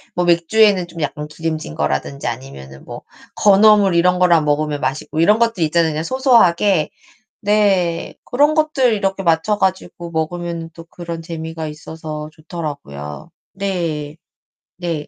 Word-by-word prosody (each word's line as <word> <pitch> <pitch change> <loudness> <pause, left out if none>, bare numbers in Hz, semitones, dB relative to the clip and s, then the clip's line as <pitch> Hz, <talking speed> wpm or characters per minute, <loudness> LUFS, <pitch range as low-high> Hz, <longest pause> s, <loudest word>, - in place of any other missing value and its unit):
뭐 180 0 +1
맥주에는 180 +2 +3
좀 170 -1 -9
약간 150 0 -3
기름진 155 - -5
거라든지 140 - -2
아니면은 115 - -7
뭐 - - -8 0.3
건어물 205 -2 +5
이런 180 +1 +3
거랑 170 -4 +4
먹으면 150 0 0
맛있고 150 +3 -3
이런 210 +7 +4
것들 230 -7 +1
있잖아요. 160 +1 +2
그냥 155 +1 -3
소소하게 205 - +3 0.5
네. 200 -5 +1
고런 290 +4 +2
것들 305 -6 +2
이렇게 195 -2 -1
맞춰 170 +5 +2
가지고 185 -3 -2
먹으면은 170 +1 -3
또 165 - -11
그런 170 -1 -7
재미가 160 -1 -6
있어서 155 0 -7
좋더라고요. 145 - -7 0.2
네. 170 -6 -3 0.6
네. 165 -4 -4
170 Hz, 320 characters per minute, -18 LUFS, 155-195 Hz, 0.6 s, 건어물